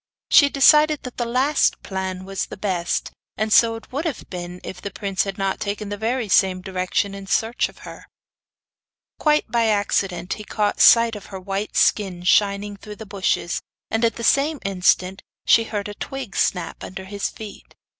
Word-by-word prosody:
She 285 - +7
decided 300 +2 +5
that 250 - -8
the 240 - -1
last 260 +5 +1
plan 190 -1 -4
was 195 0 -3
the - - -9
best; 185 -4 -2 0.3
and 215 +1 0
so 230 -1 +5
it 225 - -12
would 280 +5 -2
have 310 -8 -4
been 180 -1 -6
if 180 - -8
the 200 - -4
prince 195 -1 -2
had 195 -1 -5
not 195 -1 -1
taken 210 0 -4
the 205 - -3
very 225 +2 -2
same 190 -1 +3
direction 185 +1 -1
in 195 -1 -9
search 225 +4 0
of - - -16
her. - - -11 1.1
Quite 300 -1 +2
by 235 -1 +2
accident 195 -4 0
he 210 - -8
caught 210 0 -1
sight 230 -1 +6
of 210 - -10
her 190 - -8
white 195 +2 -4
skin 190 -4 +2
shining 200 +2 +2
through 210 +1 -10
the 220 - -10
bushes, 195 -3 -1 0.3
and 225 +1 0
at 230 - +2
the 230 - -7
same 280 +5 +2
instant 185 0 +1 0.2
she 230 - +5
heard 205 -2 -4
a 205 - -6
twig 265 0 -7
snap 180 -3 -1
under 190 +1 -7
his 200 +1 -3
feet. 215 -2 -11
205 Hz, 185 wpm, -22 LUFS, 190-230 Hz, 1.1 s, She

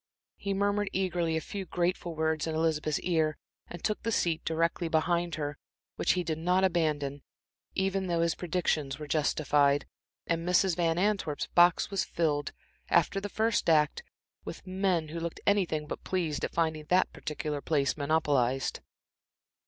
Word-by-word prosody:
He 200 -1 -2
murmured 205 +1 +1
eagerly 175 -4 0
a - - -2
few 200 +3 -5
grateful 175 -1 -2
words 160 0 0
in 160 - -2
Elizabeth's 155 -2 0
ear, 160 -4 +1 0.3
and 175 - -9
took 215 - -1
the 230 - -1
seat 170 -6 0
directly 165 +1 0
behind 170 +1 +1
her, 145 -1 -4 0.4
which - - +2
he 180 - -1
did 160 -2 -3
not 180 +3 +2
abandon, 150 -6 0 0.5
even 190 0 0
though 170 -1 +1
his 170 0 +2
predictions 160 -6 -1
were 155 - -7
justified, 145 -1 +2 0.4
and 165 0 -1
Mrs. 180 0 +3
Van 165 -1 +1
Antwerp's 190 -6 0
box 175 +2 +5
was 195 -1 +1
filled, 150 -3 -1 0.4
after 195 - +3
the 205 - -4
first 220 -2 +1
act, 150 -2 +3 0.4
with - - -8
men 185 -4 0
who 165 +2 -5
looked 170 0 -4
anything 180 -7 +2
but - - -6
pleased 170 -6 -1
at - - -1
finding 160 -2 -1
that 180 +4 +2
particular 150 -1 -4
place 140 -3 +1
monopolized. 140 -4 +1
165 Hz, 160 wpm, -30 LUFS, 155-180 Hz, 0.5 s, box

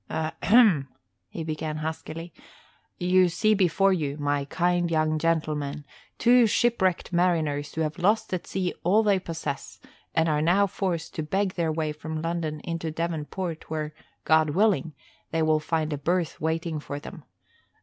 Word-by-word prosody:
"Ahem," 160 - +3 0.4
he 165 - -5
began 155 -1 -3
huskily. 160 +1 -5 0.6
"You 180 0 +4
see 185 +5 +2
before 195 0 +3
you, 145 -5 -2
my 145 -1 0
kind 175 +3 +1
young 155 -1 +1
gentleman, 150 -3 -1 0.3
two 240 -1 +5
shipwrecked 205 -6 +1
mariners 155 -5 +1
who 160 - -1
have 155 +2 -2
lost 205 +3 +1
at 180 - -3
sea 185 -2 -2
all 200 +6 +4
they 200 -3 +3
possess 165 -5 -5 0.4
and 160 0 +3
are 150 -1 +1
now 180 +6 +4
forced 180 -4 -3
to - - -3
beg 190 +5 -1
their 165 -2 0
way 155 -1 -1
from 155 +1 -5
London 165 -2 -3
into 165 -1 -3
Devon 165 -1 -2
Port 170 +1 -5
where, 155 -1 -3 0.3
God 160 -1 +4
willing, 175 -3 +1 0.3
they 165 0 0
will 155 0 +3
find 155 0 -1
a 145 - -4
berth 175 +2 -1
waiting 160 0 -1
for 145 -1 -6
them. - - -10
165 Hz, 160 wpm, -26 LUFS, 155-180 Hz, 0.6 s, two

